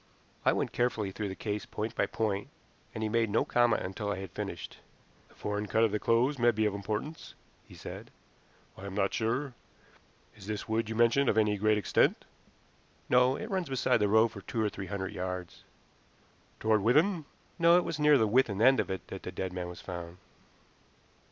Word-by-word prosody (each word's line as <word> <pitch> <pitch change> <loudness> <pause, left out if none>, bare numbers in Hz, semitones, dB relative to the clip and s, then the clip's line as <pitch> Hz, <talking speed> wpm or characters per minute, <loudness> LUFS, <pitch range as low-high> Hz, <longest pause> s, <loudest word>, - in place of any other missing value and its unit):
I - - +4
went - - -1
carefully 115 -5 0
through 105 +2 -4
the 95 - -6
case 105 0 -4
point 110 +2 -4
by - - 0
point, 105 -3 -2 0.4
and 110 - -5
he - - +1
made 115 0 +1
no 105 - +2
comment 120 -2 +2
until 100 +2 -3
I - - -1
had 95 -2 -7
finished. - - -6 0.5
"The - - -23
foreign 105 0 -3
cut 110 +3 +2
of 110 - +3
the 105 - -1
clothes 125 +6 +2
may 120 0 +5
be 110 -2 +1
of 105 - +1
importance," 105 +10 -5 0.3
he - - -14
said. - - -9 0.7
"I 100 - -8
am 95 - -7
not 100 -1 +1
sure. 125 +4 -1 0.8
Is 100 -2 -13
this 105 -1 -4
wood 110 0 -1
you 110 - -3
mention 120 +4 +3
of - - +1
any 105 -1 +3
great 105 +1 +2
extent?" 105 - +2 0.8
"No, 125 +1 +4
it 220 +8 -6
runs 185 -5 -1
beside 130 -3 +2
the 105 -2 +2
road 110 +3 +4
for 100 - -9
two 115 -2 -2
or 105 - +1
three 95 -2 -7
hundred 95 +1 -4
yards." 90 -2 -5 1.0
"Toward 110 -1 +2
Withan?" 155 - +3 0.3
"No; 170 +1 +6
it 180 - +2
was 165 -3 -4
near 150 -1 +6
the 110 - +3
Withan 110 -3 +2
end 130 +4 +5
of - - -1
it 95 -1 -4
that - - -7
the - - -6
dead 95 -1 -4
man 90 -1 -4
was 90 - -9
found." 85 -1 -7
110 Hz, 205 wpm, -30 LUFS, 100-120 Hz, 1.0 s, No